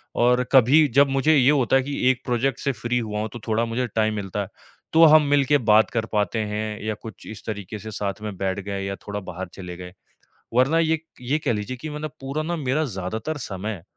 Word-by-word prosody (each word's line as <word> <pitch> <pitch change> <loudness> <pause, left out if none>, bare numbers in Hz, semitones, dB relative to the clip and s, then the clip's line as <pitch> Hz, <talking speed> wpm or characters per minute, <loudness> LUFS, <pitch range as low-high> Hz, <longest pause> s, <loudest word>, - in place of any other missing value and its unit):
और 125 +1 +3
कभी 135 +4 +6
जब 140 0 +6
मुझे 135 +4 +3
ये 135 -2 +5
होता 135 -4 +2
है 135 - +5
कि 140 -2 0
एक 125 - -4
प्रोजेक्ट 125 +1 0
से 140 - 0
फ्री 125 -1 -2
हुआ 105 -2 -3
हूँ, 110 +1 -2
तो 120 - -7
थोड़ा 115 +1 +1
मुझे 120 +2 -2
टाइम 110 -1 +2
मिलता 100 0 -3
है। 100 - -4 0.5
तो 165 +1 +7
हम 155 0 +8
मिलके 145 0 +4
बात 110 -4 +4
कर 115 -2 -1
पाते 105 0 0
हैं, 105 0 -3
या 110 - -1
कुछ 110 -4 -10
इस 110 - -9
तरीके 105 -1 -5
से 110 +2 -8
साथ 100 0 -4
में 105 -2 -5
बैठ 95 +1 -1
गए, 100 0 -4
या 100 0 -3
थोड़ा 105 0 -3
बाहर 95 -1 -7
चले 90 -2 -8
गए। 90 0 -9 0.6
वरना 130 +7 +3
ये 160 0 +2
क 155 - -22 0.2
ये 135 +5 0
कह 120 - +2
लीजिए 110 +4 -4
कि 155 +6 -7
मतलब 150 0 -5
पूरा 140 +3 -3
ना 170 +2 -2
मेरा 150 0 0
ज़्यादातर 110 +6 -4
समय 100 - -5
115 Hz, 230 wpm, -23 LUFS, 105-135 Hz, 0.6 s, हम